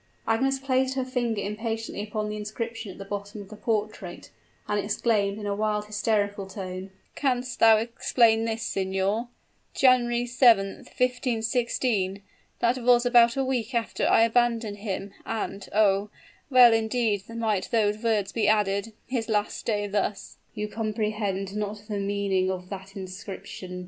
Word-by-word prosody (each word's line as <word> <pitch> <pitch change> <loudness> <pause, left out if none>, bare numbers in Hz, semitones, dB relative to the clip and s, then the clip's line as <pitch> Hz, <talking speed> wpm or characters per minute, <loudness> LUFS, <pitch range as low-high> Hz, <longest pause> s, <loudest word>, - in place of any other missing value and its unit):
Agnes 265 +5 +2
placed 265 -1 0
her 260 -1 -1
finger 240 -5 -1
impatiently 225 0 -3
upon 210 0 -3
the 210 - -4
inscription 225 +1 -5
at - - -13
the 195 - -8
bottom 205 +2 -6
of 200 -1 -10
the 215 - -9
portrait, 210 -4 -3 0.4
and 210 0 0
exclaimed 205 -1 0
in 210 - -6
a 200 - 0
wild, 210 0 0
hysterical 210 -1 -1
tone, 190 -1 -6 0.2
"Canst 255 -3 -1
thou 225 -1 +7
explain 225 0 +2
this, 225 0 -2
signor? 195 +4 -1 0.5
'January 245 -2 +4
7th, 235 -5 +3
1516,' 235 -5 0 0.4
that 240 +2 +2
was 245 0 +4
about 240 0 +5
a 270 - +1
week 250 -2 -2
after 230 -1 0
I 225 - +5
abandoned 230 -2 +1
him; 200 -1 -5
and, 205 -3 -4
oh! 205 -1 +3 0.4
well 250 -3 +8
indeed 220 -2 0
might 220 -4 -1
those 215 -2 +1
words 215 -4 +1
be 225 - 0
added 210 0 +1
'His 240 -3 -3
last 210 -1 -1
day 205 -2 0
thus!'" 205 0 -2 0.2
"You 210 -1 -2
comprehend 210 -3 -2
not 210 0 -4
the 210 -2 -3
meaning 200 -2 0
of 180 -1 -4
that 195 0 -8
inscription!" 185 -1 -7
215 Hz, 150 wpm, -26 LUFS, 200-235 Hz, 0.5 s, well